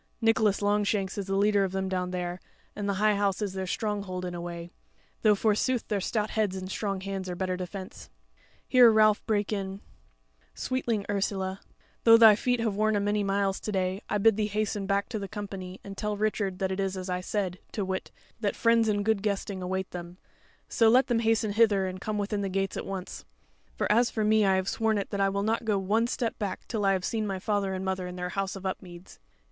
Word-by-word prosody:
Nicholas 225 -3 +2
Longshanks 205 -1 +1
is 200 - -4
the 195 - -1
leader 205 0 +3
of 190 -1 -2
them 190 0 -1
down 185 -1 -1
there, 180 0 -3 0.4
and 205 -1 -3
the 200 - 0
High 210 +2 +3
House 200 -1 0
is 205 -3 -2
their 190 -1 -3
stronghold 200 -3 -3
in 180 - -4
a 175 - -5
way; 170 0 -6 0.5
though 215 -2 +5
forsooth 220 +4 +1
their 205 -3 0
stout 215 +2 -1
heads 210 -4 0
and 185 0 -5
strong 195 -2 -2
hands 195 -1 -4
are 180 - -3
better 185 0 -1
defence." 185 +1 -7 0.6
Here 245 -2 +7
Ralph 215 -1 +4
brake 210 -1 0
in: 195 -1 -3 0.8
"Sweetling 235 -5 -1
Ursula, 195 -1 -2 0.4
though 230 0 +8
thy 220 -2 +8
feet 245 +3 0
have 225 -3 0
worn 215 +1 +2
a - - +2
many 205 +1 0
miles 195 -1 0
to 215 - -4
day, 190 0 -1
I 210 - +1
bid 215 +1 +4
thee 210 -1 +1
hasten 210 -1 -2
back 200 0 +1
to 220 - -3
the 200 - -5
company 195 -3 -7
and 195 0 -8
tell 210 +1 -2
Richard 205 -3 -1
that 190 -1 -1
it 190 - -3
is 195 -1 -1
as 185 0 -5
I 180 0 -2
said, 185 -1 -2
to 205 - -2
wit, 190 0 -3 0.3
that 205 -3 -1
friends, 230 -1 +3
and 205 -1 0
good 220 -2 +2
guesting 200 -2 -2
await 190 +1 -3
them; 175 0 -8 0.5
so 225 -1 +4
let 255 +4 +4
them 235 -2 +2
hasten 225 -1 +1
hither 205 -3 +3
and 185 0 -5
come 215 0 -2
within 205 0 -1
gates 195 0 -1
at - - -5
once. 190 -2 -6 0.5
For - - -1
as 235 +3 +4
for 220 - -2
me, 215 0 +4
I 190 - +4
have 190 0 0
sworn 220 0 +1
it 200 - -3
that 200 - -1
I 195 - +3
will 200 +1 -1
not 225 +2 0
go 215 -3 +1
one 210 +5 +1
step 240 -1 -2
back 200 -4 -4
till 215 -4 -1
I 195 - +4
have 185 -1 -1
seen 220 -2 -1
my 195 -1 -2
father 200 -1 -1
and 185 +1 -4
mother 190 -1 -2
in 180 - -7
their 180 0 -3
house 195 +1 -2
of 195 0 -9
Upmeads. 180 -1 -7
200 Hz, 230 wpm, -28 LUFS, 190-215 Hz, 0.8 s, though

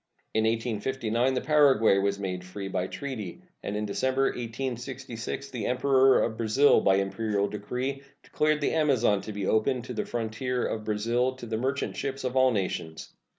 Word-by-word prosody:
In 110 0 +2
1859 115 +2 0
the 125 - 0
Paraguay 135 -10 +4
was 100 0 0
made 90 -2 -4
free 95 +2 -6
by 95 -1 -2
treaty, 115 -10 -6 0.2
and 100 - -4
in 105 - -2
December, 130 +6 0
1866, 125 +2 -5
the 125 -3 -3
Emperor 130 +1 +4
of 110 -1 -2
Brazil 115 +6 +4
by 95 - +4
imperial 100 +1 0
decree 125 +7 -4 0.2
declared 155 0 +1
the - - +1
Amazon 130 -10 +2
to 110 - -7
be 100 -2 -4
open 120 +5 +1
to 125 - -6
the - - -2
frontier 120 +2 -2
of 110 -1 -3
Brazil 115 +4 0
to 130 - -9
the 115 -1 -3
merchant 135 +4 -2
ships 135 0 -3
of 130 0 -2
all 130 0 +5
nations. 90 -7 -3
120 Hz, 170 wpm, -27 LUFS, 105-130 Hz, 0.2 s, all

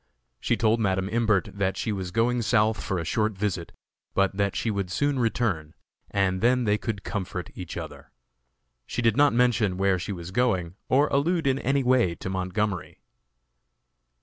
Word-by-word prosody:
She - - 0
told 115 +1 +2
Madam 95 -3 0
Imbert 110 -5 +1
that 100 -1 -1
she 110 - -2
was 95 -3 -3
going 120 +5 +1
South 110 0 +2
for 95 - -2
a 85 - -3
short 110 +5 0
visit, 95 -3 -3 0.4
but 95 0 +2
that 100 -1 0
she 115 - 0
would 100 -3 -2
soon 145 +7 0
return, 105 -10 -1 0.3
and 95 -2 0
then 125 +2 +3
they 105 -1 +1
could 105 -4 -4
comfort 90 -3 -4
each 90 -3 -7
other. - - -8 0.8
She 125 - -3
did 115 -2 +3
not 145 +1 +5
mention 115 -6 +2
where 95 -1 +2
she 95 - -4
was 90 -1 -6
going, 95 -7 +1 0.2
or 140 +3 +4
allude 165 +4 +1
in 135 0 +2
any 135 +1 +1
way 125 -9 +3
to 95 - -5
Montgomery. 95 +1 -2
105 Hz, 175 wpm, -26 LUFS, 95-120 Hz, 0.8 s, not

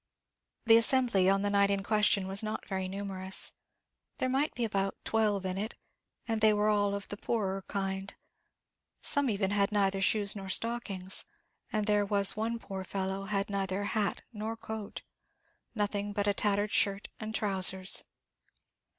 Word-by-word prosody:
The 225 0 +8
assembly 230 -6 +3
on 195 +1 +3
the 205 - +1
night 200 0 +4
in 200 -1 0
question 210 -2 +3
was 195 +1 -1
not 215 0 -4
very 190 -1 -2
numerous; 190 -1 -2 0.7
there 255 - 0
might 275 +4 0
be 240 - 0
about 195 -2 -1
twelve 210 -3 +1
in 185 +1 -2
it, 215 +3 -4 0.5
and 225 -1 0
they 215 0 +6
all - - 0 0.3
were 200 - -1
of 200 - -9
the 205 - -5
poorer 195 -4 -2
kind; 195 -1 -3 0.9
some 285 -2 +2
even 200 -2 0
had 200 0 +2
neither 195 -2 +1
shoes 205 +1 +4
or 195 -2 -6
stockings, 195 -4 -2 0.4
and 215 -2 0
there 210 -1 +3
was 200 -1 +3
one 225 +2 -1
poor 195 -4 -6
fellow 190 +1 -3
had 200 0 -1
neither 195 0 -1
hat 205 0 -1
nor 220 +1 -4
coat, 220 -2 -6 0.7
nothing 205 -1 -1
but 205 0 0
a 205 - +3
tattered 205 +1 +1
shirt 200 -1 +1
and 220 0 -4
trousers. 190 -2 0
200 Hz, 160 wpm, -31 LUFS, 195-215 Hz, 0.9 s, The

